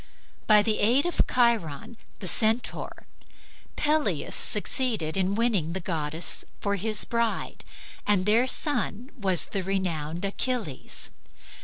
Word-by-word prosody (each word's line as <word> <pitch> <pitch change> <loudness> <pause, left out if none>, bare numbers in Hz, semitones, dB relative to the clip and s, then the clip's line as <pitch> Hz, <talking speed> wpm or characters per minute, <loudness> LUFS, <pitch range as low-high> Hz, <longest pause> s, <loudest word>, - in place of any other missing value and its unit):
By 210 -1 +7
the 215 0 +1
aid 245 +8 +3
of 350 - 0
Chiron 230 - 0 0.3
the 185 - -4
Centaur, 220 +6 0 0.7
Peleus 300 0 0
succeeded 220 - +1
in 190 +1 0
winning 205 -8 0
the 190 - -3
goddess 160 -2 -1 0.2
for 200 0 -1
his 210 +2 +3
bride 235 -1 -2 0.4
and 200 -3 +2
their 225 +5 +4
son 260 -3 -1
was 190 - +2
the 195 - -3
renowned 175 -3 -2
Achilles. 205 - -3
210 Hz, 120 wpm, -26 LUFS, 185-235 Hz, 0.7 s, By